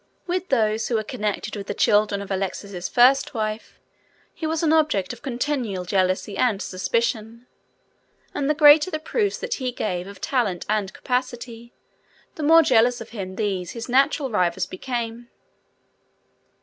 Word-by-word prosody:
With 365 +1 -2
those 220 -3 +1
who 240 - -1
were 220 - 0
connected 210 0 -3
with 200 -1 -7
the - - -3
children 205 -1 +2
of 200 - -10
Alexis' 190 -1 -3
first 260 +2 +4
wife 215 0 -4 0.5
he 320 - -4
was 320 +1 -1
an 315 -1 +3
object 305 -13 +1
of - - -13
continual 245 -8 -2
jealousy 185 +2 0
and 230 -6 +2
suspicion, 225 +4 -2 0.9
and 285 0 -1
the 300 - +2
greater 295 +2 +7
the 310 - -2
proofs 400 +6 -1
that 485 -1 -3
he 255 -1 -1
gave 180 -6 -3
of 200 0 -11
talent 220 -10 -1
and 210 -2 0
capacity, 240 -1 -4 0.6
the - - -8
more 325 +2 +6
jealous 245 -2 +3
of 230 - -9
him 190 -4 -6
these 190 -5 -2
his 230 0 -6
natural 270 +1 +2
rivals 180 -5 +1
became. 235 +2 -5
230 Hz, 155 wpm, -23 LUFS, 200-275 Hz, 0.9 s, greater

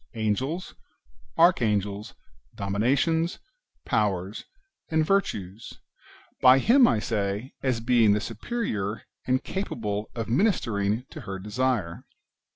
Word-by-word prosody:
Angels, 130 - -2 0.6
Archangels, 105 - +2 0.4
Dominations, 135 - +1 0.5
Powers, 100 -1 -1 0.4
and 160 -1 +2
Virtues, 110 - -1 0.3
— - - -26
[by 130 0 +8
him, 245 - +5
I - - +2
say,] 105 +2 -2
as 130 -4 0
being 115 -3 +4
the 105 - +1
superior, 110 - -3 0.2
and 130 0 +1
capable 110 - -3
of 115 -2 -3
ministering 115 - +1
to 155 - -8
her 95 -4 -6
desire. 105 -3 -2
115 Hz, 105 wpm, -26 LUFS, 105-135 Hz, 0.6 s, by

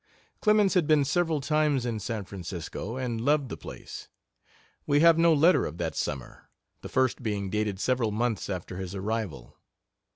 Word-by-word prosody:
Clemens 210 -2 +4
had 180 -6 +2
been 150 -2 +4
several 160 +1 +1
times 150 -3 +1
in 115 -3 -2
San 105 -1 -4
Francisco, 90 +5 -6
and 120 -3 -2
loved 140 0 +2
the - - -4
place. - - -9 0.8
We 145 0 +3
have 165 0 +6
no 170 0 +5
letter 160 +4 +5
of 80 - -8
that 80 -4 -3
summer, 65 -3 -5 0.3
the - - -8
first 130 -1 +1
being 100 -4 -2
dated 105 -2 -1
several 125 -1 +1
months 115 0 -1
after 90 -1 -5
his 95 0 -5
arrival. 95 - -4
115 Hz, 165 wpm, -28 LUFS, 100-150 Hz, 0.8 s, have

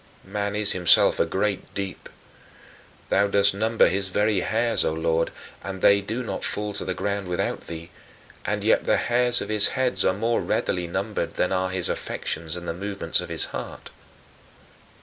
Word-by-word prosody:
Man 100 +1 -3
is 105 -1 +2
himself 90 -2 +4
a - - +2
great 100 0 -2
deep. 100 -1 -5 1.0
Thou 100 +1 +3
dost 100 0 +3
number 110 +3 +3
his 95 +1 0
very 105 +1 +1
hairs, 115 +5 +1
O - - +1
Lord, 80 +1 0 0.3
and 95 -1 -5
they 100 0 +6
do 110 +5 -4
not - - -5
fall 105 0 -2
to 100 - -2
the 95 - -3
ground 100 -1 -2
without 90 0 -2
thee, 85 +1 -8 0.5
and - - -2
yet - - +3
the - - +3
hairs 120 0 +3
of - - -5
his 105 -1 +6
head 125 -7 +2
are - - +3
more 115 +3 0
readily 90 -1 -1
numbered 100 0 -3
than 90 - 0
are 95 0 0
his 95 -2 -1
affections 80 0 -3
and 90 0 -7
the 85 - -2
movements 100 +3 -2
of - - -8
his - - +1
heart. - - -7
100 Hz, 180 wpm, -24 LUFS, 90-105 Hz, 1.0 s, they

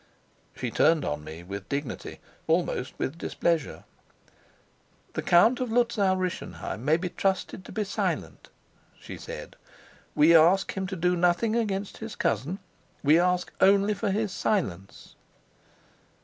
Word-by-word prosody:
She - - -4
turned 160 -2 +3
on 75 0 -3
me 80 +3 -9
with 100 +2 -7
dignity, 140 -1 -4 0.3
almost 160 -6 0
with 160 +6 -3
displeasure. 165 -4 -1 1.3
"The - - -2
Count 200 +9 +4
of 250 -3 -2
Luzau 225 -5 +2
Rischenheim 180 - -4
may 155 +3 +3
be 180 +1 -3
trusted 190 0 -2
to - - -10
be 215 +2 -1
silent," 195 -5 -3 0.5
she - - -9
said. - - -9 0.6
"We 160 +3 +6
ask 170 +4 +5
him 190 -1 -2
to 190 - -4
do 180 +1 +1
nothing 180 +6 +2
against 205 -4 -2
his 220 -1 -7
cousin. 135 - -1 0.5
We 150 +3 +5
ask 180 0 +1
only 200 +2 +5
his 205 0 -1
silence." 100 - -2
180 Hz, 135 wpm, -27 LUFS, 155-200 Hz, 1.3 s, We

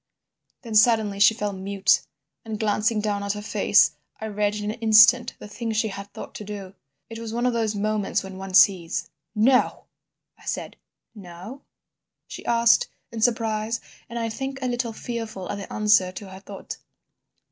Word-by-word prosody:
"Then 230 -3 -7
suddenly 215 -2 +4
she 215 +2 +6
fell 210 -3 -2
mute, 195 +1 +1 0.4
and, 220 -2 -5
glancing 215 0 +1
down 205 -1 -1
at 200 0 -1
her 210 - -6
face, - - +4 0.3
I 220 - -5
read 210 -1 -1
in 210 0 -3
an 225 - -9
instant 225 +2 +6
the - - -10
thing 225 +2 -4
she 220 0 0
had 200 0 -8
thought - - -9
to - - -7
do. 200 -2 -7 0.3
It 225 0 -8
was 225 -1 -6
one 240 +1 0
of 250 - +2
those 220 -2 0
moments 210 -1 -1
when 190 -1 -9
one 190 -1 -5
sees. 175 -4 +4 0.2
"'No!' 250 +4 +3 0.5
I - - -18
said. - - -4 0.4
"'No?' 200 +6 -10 0.6
she - - -9
asked, 235 - +4 0.2
in 225 - -5
surprise 225 -1 0 0.3
and 235 - -6
I 230 -1 -1
think 270 +4 -4
a - - 0
little 240 -1 -1
fearful 225 -4 -6
at 200 - -4
the 195 - -9
answer 210 -3 +3
to 195 0 -8
her 190 - -10
thought. 195 0 -9
215 Hz, 180 wpm, -24 LUFS, 200-230 Hz, 0.6 s, she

